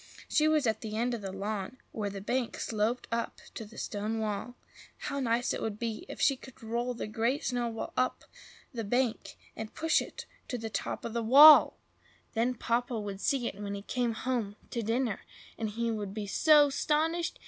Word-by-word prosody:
She 305 0 +3
was 310 -3 +3
at 220 -2 0
the 215 -1 -4
end 240 +2 0
of 235 - -3
the 195 -1 -5
lawn, 200 +4 -4
where 210 -2 -3
the 200 -1 -7
bank 245 +3 -1
sloped 225 +3 -1
up 230 0 -2
to 225 - -6
the 220 +2 -14
stone 210 +2 -3
wall. 220 +2 -3 0.4
How 280 -2 -3
nice 240 -2 +1
it - - -4
would 215 -2 -3
be 235 - -4
if - - -7
she 275 - +4
could 260 -2 -14
roll 240 +2 -2
the - - -4
Great 230 +6 -1
Snowball 240 -3 -2
up 255 - 0 0.5
the 230 -2 -3
bank, 245 +2 -1 0.2
and 220 -1 -7
push 325 0 +2
it - - -8 0.2
to 250 - -3
the 225 -1 -5
top - - -3
of 230 - -4
the 235 - 0
wall! 285 +7 +9 0.6
Then 240 +2 +1
Papa 235 0 -1
would 200 -2 -5
see 265 -4 +1
it 205 - -4
when 200 0 -3
he 200 - -7
came 240 +1 -1
home 225 -4 -2 0.2
to 235 - -1
dinner, 225 -1 0 0.4
and 220 -1 -3
he 230 +2 -1
would 205 -3 -4
be 215 -2 -3
so 295 +7 +5
'stonished! 320 +4 0
230 Hz, 200 wpm, -30 LUFS, 215-255 Hz, 0.6 s, wall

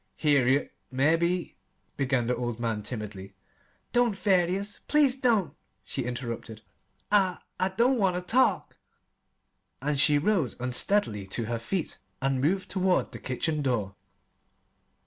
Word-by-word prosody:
"Harriet, 140 -2 +2 0.2
mebbe 165 +6 +1 0.2
" - - -44
began 130 -3 +1
the 125 +1 0
old 120 -2 -3
man 115 -3 -1
timidly. 105 -4 -7 0.6
"Don't, 240 -4 +2
Thaddeus 195 +1 +1
please 290 -4 +4
don't!" 220 - +1 0.3
she 130 - -3
interrupted. 115 -3 -5 0.5
"I 190 -3 +3 0.2
I 185 - +2
don't 240 +6 +2
want 190 -3 +2
ter 180 - -2
talk." 250 +8 +2 1.0
And 145 -1 -1
she 145 +1 +5
rose 165 - +1
unsteadily 125 - +1
to 115 +4 -3
her 115 +1 -2
feet 165 +8 -3 0.2
and 135 -1 0
moved 185 +7 0
toward 185 -1 +1
the - - -8
kitchen 150 +4 -2
door. 115 -8 -1
145 Hz, 130 wpm, -28 LUFS, 120-190 Hz, 1.0 s, she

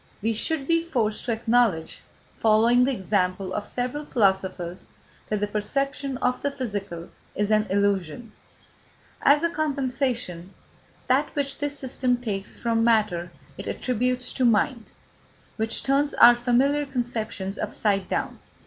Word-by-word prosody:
We 225 +1 +1
should 275 +6 -1
be 330 0 +3
forced 235 -10 -1
to 245 - -1
acknowledge, 225 -7 +1 0.4
following 230 +3 +4
the 275 - +1
example 190 -4 -1
of 210 - -3
several 250 +4 -3
philosophers, 190 -7 0 0.4
that 210 -1 -1
the - - +2
perception 275 +6 -2
of 250 0 0
the 285 - 0
physical 205 -11 -5 0.3
is 205 +1 0
an 215 0 +3
illusion. 200 +1 0 0.9
As 290 +3 +5
a 335 - +2
compensation, 255 - -2 0.5
that - - +3
which 280 -1 -2
this 290 0 -3
system 255 -2 0
takes 205 -5 -4
from 230 -1 0
matter 210 -7 +2 0.3
it - - -6
attributes 250 0 -1
to 260 - -1
mind, 230 +1 +2 0.7
which 220 0 -1
turns 280 +2 +1
our 240 0 +8
familiar 265 +4 +2
conceptions 225 -6 -3
upside 205 -2 -1
down. - - -3
235 Hz, 135 wpm, -25 LUFS, 205-265 Hz, 0.9 s, our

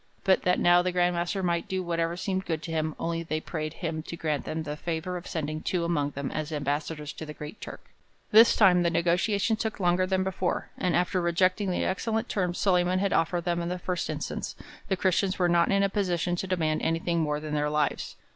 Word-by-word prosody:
But 190 -1 +4
that 180 0 +3
now 175 0 +5
the 180 +1 -1
Grand 180 0 +2
Master 175 +3 -1
might 170 +3 0
do 190 -2 -2
whatever 170 0 -1
seemed 190 0 -2
good 160 -2 -2
to 165 - -5
him, 155 -1 -1
only 165 0 -2
they 155 -1 -2
prayed 155 -1 -4
him 160 -1 -2
to 170 +2 -7
grant 155 -3 -2
them 160 0 -3
the 150 -1 -4
favour 170 +3 -3
of 175 - -6
sending 155 -1 -3
two 175 0 -1
among 150 -4 0
them 140 -1 -3
as 155 0 -3
ambassadors 150 +1 -3
to - - -8
the 150 -1 -8
Great 150 +7 -9
Turk.' - - -9 0.5
This 225 +2 +7
time 185 -4 +5
the 170 - +2
negotiations 180 +6 +1
took 220 -2 -3
longer 180 0 +2
than 190 0 +1
before, 185 -1 -2
and 180 -1 0
after 180 +1 +1
rejecting 185 +3 +2
the 180 - 0
excellent 220 +4 -1
terms 180 -3 -1
Solyman 180 -1 +2
had 200 +1 +1
offered 170 +1 +1
them 175 -1 0
in 170 - -3
the 180 - -2
first 180 0 -3
instance, - - -4 0.3
the 190 - 0
Christians 190 +1 +1
were 180 - +3
not 170 0 +3
in 200 0 +3
a - - +4
position 180 -3 0
to 190 - -3
demand 160 -4 0
anything 165 +1 0
more 150 -2 0
than 150 0 -6
their 150 0 +1
lives. 150 -1 -1
175 Hz, 225 wpm, -27 LUFS, 160-185 Hz, 0.5 s, This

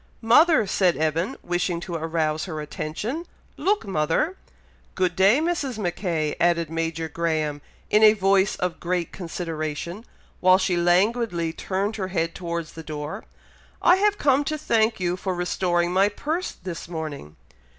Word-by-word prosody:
"Mother!" 305 +3 +5
said 185 -2 +2
Evan, 160 +3 0
wishing 175 0 -1
to 175 - -6
arouse 160 -1 -1
her 160 -5 -5
attention. 205 - -4 0.3
"Look, 400 - 0
mother!" 190 - 0 0.6
"Good 180 -2 +1
day, 195 +8 +5
Mrs. 310 -7 -1
Mackay," 175 -5 -1
added 170 -2 +2
Major 165 0 -2
Graham, 155 -2 -1 0.3
in 210 - +5
a 215 -1 +8
voice 195 -1 +2
of 180 -2 -3
great 175 -1 -2
consideration, 165 +1 -5 0.4
while 185 0 +6
she 185 -1 0
languidly 175 0 +2
turned 200 +5 -2
her 190 -3 -2
head 165 -2 -1
towards 170 -2 -4
the 165 - -8
door. 155 +5 -6 0.5
"I 360 - +5
have 415 +1 +2
come 280 0 +3
to 310 +1 -1
thank 225 -6 +1
you 180 0 -1
for 185 0 -3
restoring 175 0 0
my 195 +2 +4
purse 315 - -3
this 175 -3 -7
morning." 155 - -6
180 Hz, 150 wpm, -24 LUFS, 165-210 Hz, 0.6 s, a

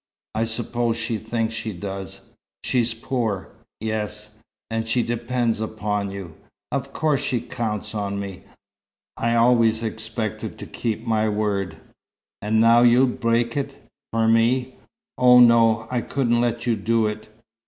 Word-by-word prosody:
"I 115 - 0
suppose 115 +1 -1
she 115 -1 -2
thinks 115 +1 -2
she 110 -1 -4
does." 95 +1 -6 0.4
"She's 120 -2 +1
poor?" 115 -5 -2 0.3
"Yes." 105 -1 -4 0.4
"And 115 0 -2
she 120 +2 +2
depends 120 -1 -1
upon 105 -2 -2
you." 95 -4 -7 0.4
"Of 135 -1 -2
course 150 -2 +1
she 125 - 0
counts 110 -3 -4
on 100 -2 -2
me. 100 -2 -6 0.7
I 115 0 0
always 115 -1 +4
expected 110 0 -4
to - - -7
keep 115 -2 -3
my 110 -1 +1
word." 105 -3 -1 0.6
"And 110 +2 +1
now 115 +1 +6
you'd 125 +1 +4
break 115 0 +1
it 140 -1 -2 0.4
for 115 0 +2
me! 120 +3 +3 0.5
Oh, 125 0 +7
no, 115 -2 +5
I 125 -1 0
couldn't 120 -2 +1
let 120 -1 -1
you 120 -2 +2
do 115 0 +1
it. 105 0 -4
115 Hz, 145 wpm, -23 LUFS, 110-120 Hz, 0.7 s, Oh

